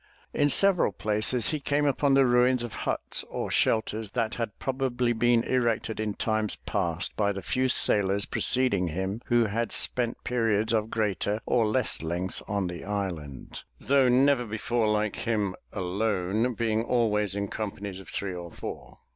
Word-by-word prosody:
In 145 - +2
several 190 - +4
places 110 +3 +1
he 155 - -2
came 145 +1 0
upon 140 0 +2
the 135 -1 +5
ruins 125 0 +3
of 120 - -6
huts - - -1
or - - -4
shelters 110 -1 +1
that 115 -2 -1
had 115 -3 -4
probably 125 -2 -1
been 120 0 +2
erected 115 -3 -1
in 105 -2 -2
times 110 -2 -1
past 85 0 -2
by 100 -1 +1
the 100 -2 -6
few 130 +6 0
sailors 100 -4 +3
preceding 125 -8 +1
him 95 +6 -3
who 120 -1 +3
had 115 +3 -2
spent 120 -1 +1
periods 115 -2 +1
of 110 -1 0
greater 105 -1 -1
or 115 -3 +2
less 125 +2 +1
length 85 +3 -3
on 100 -2 -1
the 85 -2 -6
island, 90 -9 -5 0.2
though 135 -2 +3
never 130 0 +3
before 110 +1 -1
like 105 0 0
him 105 -4 -1 0.2
alone, 100 +4 -1
being 110 -1 0
always 105 -5 +1
in 100 0 -2
companies 100 -2 -5
of 95 - -11
three 100 -2 -3
or 85 -1 -7
four. - - -8
110 Hz, 165 wpm, -27 LUFS, 100-120 Hz, 0.2 s, the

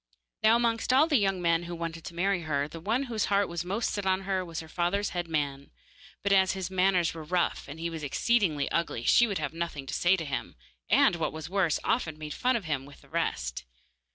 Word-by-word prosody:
Now 220 +1 +6
amongst 235 0 +1
all 270 +4 +6
the 300 -6 +3
young 195 -3 0
men 170 0 +2
who 175 - -4
wanted 165 -1 -5
to 170 - -8
marry 190 +1 +1
Barbaik, 145 -1 -1
the 165 - -7
one 225 +10 0
whose 230 -5 -1
heart 200 -1 +2
was 170 0 -3
most 200 +6 -1
set 205 - -3
on 190 0 +1
her 190 -1 -1
was 165 -3 -6
her 160 - -8
father's 180 +5 0
head 175 -1 -3
man, 140 -3 -2 0.5
but 200 - +1
as 190 -1 +4
his 190 -1 -4
manners 185 -2 +2
were 165 -1 -7
rough 175 +3 -1
and 145 +3 -8
he 165 - -2
was 165 -2 -5
exceedingly 155 - +1
ugly 170 -8 -1
she 240 - +5
would 200 -3 -2
have 150 -1 -3
nothing 165 -4 -4
to - - -6
say 175 +2 +3
to 165 - -4
him, 140 -2 -4 0.3
and, 170 - +5
what 165 - -1
was 160 +2 -7
worse, 185 -6 +2
often 160 -10 0
made 155 -1 -6
fun 255 +1 +1
of 220 -6 -2
him 145 -4 -1
with 145 - -15
the - - -20
rest. - - -2
175 Hz, 240 wpm, -29 LUFS, 160-200 Hz, 0.5 s, Now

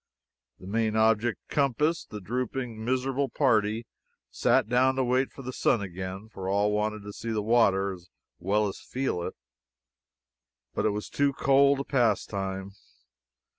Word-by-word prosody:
The - - -12
main 110 +2 0
object 110 +1 +2
compassed, 150 +4 0
the 105 - -6
drooping, 120 +2 -3
miserable 130 +3 0
party 110 -4 +1 0.5
sat - - +2
down 130 +2 +3
to 135 - +1
wait 130 +2 +1
for 135 - -11
the 130 +1 -5
sun 120 - +2
again, 95 +1 -6
for 95 -4 -6
all 100 +1 +2
wanted 105 0 -1
to 105 0 -8
see 115 - -6
the 110 -2 -1
water 100 -4 +3
as 90 -1 -13 0.3
well 105 +3 +1
as 95 - -6
feel 130 -9 -2
it. - - -5 1.4
But - - +1
it - - +3
was 105 0 -3
too 140 0 +1
cold 140 +1 +4
a - - -3
pastime. 100 -6 -1
110 Hz, 155 wpm, -28 LUFS, 100-130 Hz, 1.4 s, cold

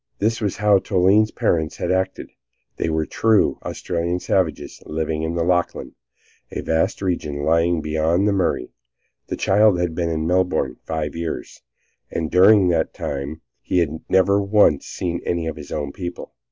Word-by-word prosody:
This 115 +3 0
was 100 -3 -1
how 105 -1 +4
Toline's 100 +3 +3
parents 80 -6 -1
had - - -2
acted. 95 0 -2 0.5
They - - -1
were 80 0 0
true 110 +4 +2
Australian 85 +1 -3
savages 90 -3 -1
living 80 0 -2
in 80 +1 -2
the 85 - 0
Lachlan, 90 0 -1 0.6
a - - -5
vast 80 +5 0
region 75 -6 -2
lying 85 +1 +2
beyond 80 +5 +1
the - - +3
Murray. 90 -9 -1 0.6
The - - -4
child 100 -1 +3
had 85 -2 -1
been 85 0 -1
in 80 -1 -2
Melbourne 90 -7 0
five 80 -2 -3
years, 85 -1 -5 0.5
and 80 -1 -3
during 95 0 +6
that 85 -2 0
time 70 +3 -5 0.3
had 80 -3 +1
never 100 +2 +4
once 100 -7 +3
seen 85 -1 -3
any 85 -1 -1
of 80 -2 -3
his 75 -2 -10
own 70 -2 -3
people. 90 +1 -7
85 Hz, 160 wpm, -21 LUFS, 80-95 Hz, 0.6 s, during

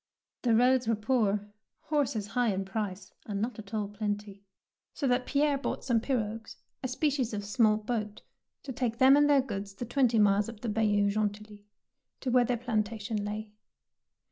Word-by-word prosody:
The 235 -3 +3
roads 250 +1 +4
were 225 - +3
poor, 210 -2 +1 0.4
horses 270 -9 -1
high 240 +1 +1
in 195 0 -2
price 195 -1 -4
and 200 -2 -3
not 230 +2 -3
at 210 -1 -10
all 215 -2 -1
plenty, 205 -1 -4 0.5
so 280 - -1
that 250 0 +1
Pierre 285 -1 +2
bought - - -3
some 240 -3 +2
pirogues, 225 -3 -3 0.3
a 260 - -2
species 260 -3 0
of 205 -1 -4
small 215 0 +3
boat, 215 -1 -4 0.4
to 270 - -6
take 235 -2 -2
them 265 +2 +7
and 290 0 +4
their 285 -2 +5
goods 200 -5 -6
the 240 - -5
twenty 245 -1 +2
miles 205 0 +3
up 220 -2 -11
the 235 - -3
Bayou 205 -2 +2
Gentilly, 210 0 -3 0.5
to 255 - -1
where 245 0 +5
their 245 0 0
plantation 220 -2 -2
lay. 210 +1 -5
220 Hz, 175 wpm, -29 LUFS, 205-250 Hz, 0.5 s, them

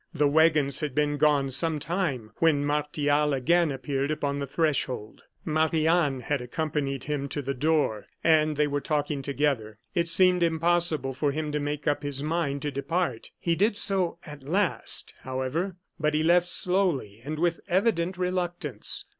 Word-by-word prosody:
The 145 - +3
wagons 150 -2 +3
had 150 -5 -3
been 145 0 +1
gone 145 -2 +2
some 160 +4 +2
time, 145 - -2
when 150 -3 +2
Martial 150 0 +1
again 165 +4 +2
appeared 135 +1 -2
upon 145 -2 -2
the 140 - -3
threshold. 135 -7 -1 0.2
Marie 155 0 +1
Anne 160 -6 +2
had 145 +1 -2
accompanied 140 0 -3
him 145 -2 -3
to 145 - -3
the 140 -1 -3
door, 145 -6 0 0.2
and 155 -2 +3
they 150 - +3
were 145 0 -2
talking 145 -1 -1
together. 135 -6 -1 0.2
It 170 -1 0
seemed 180 +1 +4
impossible 165 -4 +1
for 140 +2 0
him 155 +1 -3
to 150 - -1
make 145 +1 -4
up 145 - +1
his 145 -1 -2
mind 150 -3 -1
to 145 - -2
depart. 140 -2 -2
He 170 - 0
did 205 +5 +1
so, 185 -4 +1
at 150 -3 -10
last, 180 +8 +1
however; 130 +8 -3 0.2
but 150 0 0
he 155 - +1
left 175 +2 +4
slowly 175 - +1
and 155 +3 -5
with 170 +1 0
evident 185 -2 +1
reluctance. 175 -4 -1
150 Hz, 165 wpm, -26 LUFS, 140-170 Hz, 0.2 s, seemed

